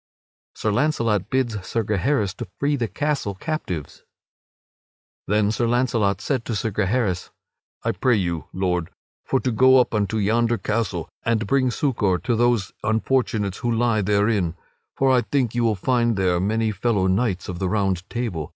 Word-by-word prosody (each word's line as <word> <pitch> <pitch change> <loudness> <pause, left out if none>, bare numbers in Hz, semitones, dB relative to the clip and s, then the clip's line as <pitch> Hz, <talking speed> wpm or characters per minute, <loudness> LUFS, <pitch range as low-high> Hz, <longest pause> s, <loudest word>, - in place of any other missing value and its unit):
[Sidenote: - - -21
Sir 110 - 0
Launcelot 115 -8 +1
bids 120 -7 -1
Sir 115 - -1
Gaheris 105 0 0
to - - -5
free 145 +1 +1
the 120 -4 -1
castle 140 -3 -2
captives] 95 - -5 1.3
Then 105 +1 +2
Sir 120 +1 0
Launcelot 115 -5 +1
said 130 -5 -1
to 115 - -2
Sir 110 +2 -1
Gaheris: 100 -2 0 0.5
"I - - +1
pray 125 -2 +2
you, 85 -7 -1
Lord, 90 -3 -1 0.3
for 130 - +1
to 125 - 0
go 130 +3 +6
up 125 - +1
unto 105 +1 0
yonder 115 +3 +2
castle, 105 +1 -2
and 115 -1 0
bring 130 +3 +2
succor 115 - +1
to 120 +5 -1
those 120 -4 +1
unfortunates 110 -3 0
who 120 - -1
lie 115 -1 +2
therein. 100 -3 +1 0.4
For 135 -1 +3
I 125 -1 +4
think 130 -3 0
you 120 0 0
will 110 -2 +2
find 120 +1 +1
there 90 -2 +2
many 110 +3 0
fellow 105 -1 0
knights 95 -1 0
of 90 -1 -5
the 95 - -1
Round 95 -3 -1
Table. 110 -11 -3
110 Hz, 170 wpm, -23 LUFS, 95-120 Hz, 1.3 s, go